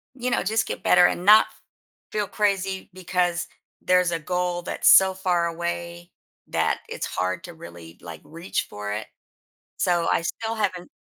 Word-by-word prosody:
you 250 0 -3
know, - - +1
just 220 +3 0
get - - -5
better, 180 0 +6
and 180 - 0
not 215 +2 +7
f - - -24 0.5
feel 210 -2 -1
crazy 195 -2 -1
because 180 -1 -1 0.3
there's 180 -1 +2
a 165 - -1
goal 180 +1 -2
that's - - -2
so 190 0 +7
far 180 -2 0
away 170 +1 -5 0.4
that - - 0
it's - - -4
hard 90 0 -3
to 175 - -9
really, 85 - -12
like, 80 -2 -10
reach 165 +3 -4
for 105 0 -5
it, 105 +1 -5 0.7
so, 175 -2 +1
I - - +1
still 225 +6 -3
haven't 190 -5 -2
175 Hz, 170 wpm, -24 LUFS, 170-190 Hz, 0.7 s, not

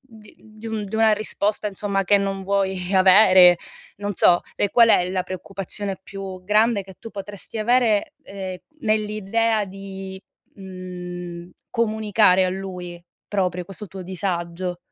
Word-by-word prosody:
di 215 -1 -16
di 215 +1 -13
un 215 -2 -3
di 200 - -8
una 220 0 +4
risposta, 210 0 -1
insomma, 195 0 -1
che 205 +2 +4
non 195 -1 -3
vuoi 190 -1 -1
avere, 185 -2 +8 0.4
non 205 0 -4
so, 175 0 +4
e 205 - 0
qual 230 -2 +6
è 180 0 +3
la 185 -1 -1
preoccupazione 195 +1 -5
più 190 -2 -8
grande 210 +1 +2
che 190 0 -14
tu 225 - -9
potresti 200 +2 -7
avere, 225 -2 +2
ehm, 190 -2 -7 0.2
nell'idea 215 0 0
di, 195 0 -9 0.3
mhmm, 180 -2 -8 0.2
comunicare 215 -4 +3
a 185 - 0
lui 180 -2 -7 0.3
proprio 180 -3 -1
questo 195 +3 -9
tuo 190 0 -8
disagio? 180 -1 -4
195 Hz, 140 wpm, -22 LUFS, 185-210 Hz, 0.4 s, avere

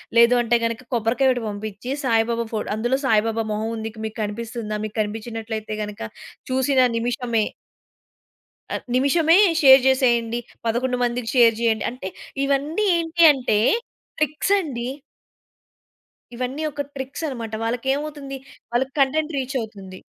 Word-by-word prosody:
లేదంటే 235 0 +5
గనక, 230 +1 -1
కొబ్బరికాయ 235 +3 +2
ఒకటి 250 -1 +1
పంపించి, 205 +3 -6
సాయిబాబా 230 -1 +1
ఫో 220 - 0 0.2
అందులో 240 +4 0
సాయిబాబా 225 -1 +2
మొహముంది. 220 +1 -3 0.2
మీకు 220 +1 -6
కనిపిస్తుందా, 220 0 -4
మీకు 215 - -8
కనిపించినట్లయితే 220 0 -4
గనుక, 210 -1 -7 0.5
చూసిన 265 +1 +2 0.2
నిమిషమే 235 -1 0 1.3
అ - - 0 0.2
నిమిషమే 315 +6 +4 0.2
షేర్ 265 -2 +9
జేసేయండి. 240 -3 +2 0.3
11 250 +2 0
మందికి 240 -1 -1
షేర్ 230 -3 +6
చేయండి. 225 -2 +1
అంటే 250 -6 -7 0.4
ఇవన్నీ 290 +9 0
ఏంటి 335 0 +1
అంటే 245 -6 +1 0.6
ట్రిక్సండి. 300 -4 0 1.5
ఇవన్నీ 255 +5 -3
ఒక 290 0 -4
ట్రిక్సన్నమాట. 265 -4 -5
వాళ్ళకేమవుతుంది? 275 +4 -2 0.3
వాళ్ళకి 260 +3 0
కంటెంట్ 300 +4 +2
రీచవుతుంది. 220 -8 -5
240 Hz, 110 wpm, -22 LUFS, 225-270 Hz, 1.5 s, షేర్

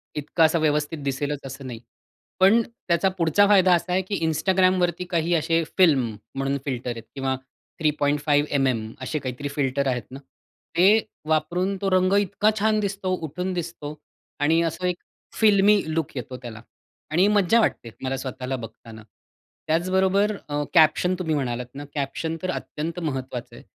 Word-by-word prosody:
इतकं 150 +3 0
असं 160 +1 +2
व्यवस्थित 150 +1 0
दिसेलच 140 +1 -2
असं 135 0 -8
नाही. 120 -3 -7 0.6
पण 205 +5 +6
त्याचा 190 -5 -1
पुढचा 170 +4 +4
फायदा 190 -3 +5
असा 175 +1 -3
आहे 185 - +2
की 195 +2 -4
Instagramवरती 180 +2 +2
काही 170 -1 0
असे 165 +1 +1
फिल्म 135 - +4 0.2
म्हणून 135 +1 -1
फिल्टर 125 -2 -3
आहेत 115 -1 -7
किंवा 135 -1 -1 0.4
3.5mm 145 -5 +1
असे 150 +4 -2
काहीतरी 130 +1 -5
फिल्टर 140 -1 -1
आहेत 125 -2 -1
ना, 135 - -8 0.6
ते 200 +5 +6 0.3
वापरून 180 +5 0
तो 195 - +1
रंग 185 +1 +3
इतका 205 +2 +1
छान 215 0 +2
दिसतो, 195 -2 -2
उठून 180 +3 -4
दिसतो. 165 -4 -5 0.5
आणि 160 +3 +3
असं 165 +3 -6
एक 180 - -1 0.4
फिल्मी 205 -1 +5
लूक 160 -3 -2
येतो 125 0 -5
त्याला 115 -3 -8 0.5
आणि 180 +5 +4
मज्जा 210 +2 +4
वाटते 120 - 0
मला 130 0 -1
स्वतःला 130 0 -4
बघताना. 115 -1 -10 0.6
त्याचबरोबर 190 +5 +2
अ, 145 0 -1
कॅप्शन 170 +3 +4
तुम्ही 160 -4 -1
म्हणालात 125 -3 -2
ना, 145 +1 -7
कॅप्शन 155 +4 -2
तर 185 - -2
अत्यंत 165 +2 -5
महत्त्वाचं 130 -6 -4
आहे. - - -13
160 Hz, 150 wpm, -24 LUFS, 135-185 Hz, 0.6 s, पण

